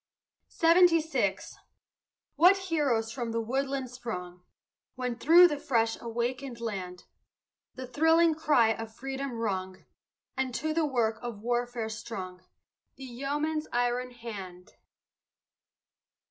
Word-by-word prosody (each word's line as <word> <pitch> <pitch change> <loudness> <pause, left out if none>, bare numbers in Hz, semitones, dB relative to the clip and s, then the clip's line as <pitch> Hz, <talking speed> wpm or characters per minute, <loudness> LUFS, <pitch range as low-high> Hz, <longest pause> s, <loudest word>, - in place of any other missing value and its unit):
SEVENTY 335 0 +5
SIX 320 +1 -2 0.8
What 360 +6 +6
heroes 290 -12 0
from 235 -1 -4
the 230 - -1
woodland 265 +2 -2
sprung, 180 -8 -7 0.5
When, 250 -2 -3
through 340 +8 +7
the 295 -4 -3
fresh 230 -5 +1
awakened 240 +2 -3
land, 185 -6 -5 0.7
The 255 - -6
thrilling 320 +5 +3
cry 300 -7 +3
of 225 0 -3
freedom 270 0 -5
rung 190 -5 -4 0.5
And 260 -2 -2
to 315 +4 -1
the 320 -1 +1
work 225 -5 0
of 235 -4 -7
warfare 240 -1 -1
strung 190 -5 -7 0.5
The 270 - -11
yeoman's 295 +5 -2
iron 245 +1 0
hand! 200 -7 -9
245 Hz, 115 wpm, -29 LUFS, 225-290 Hz, 0.8 s, through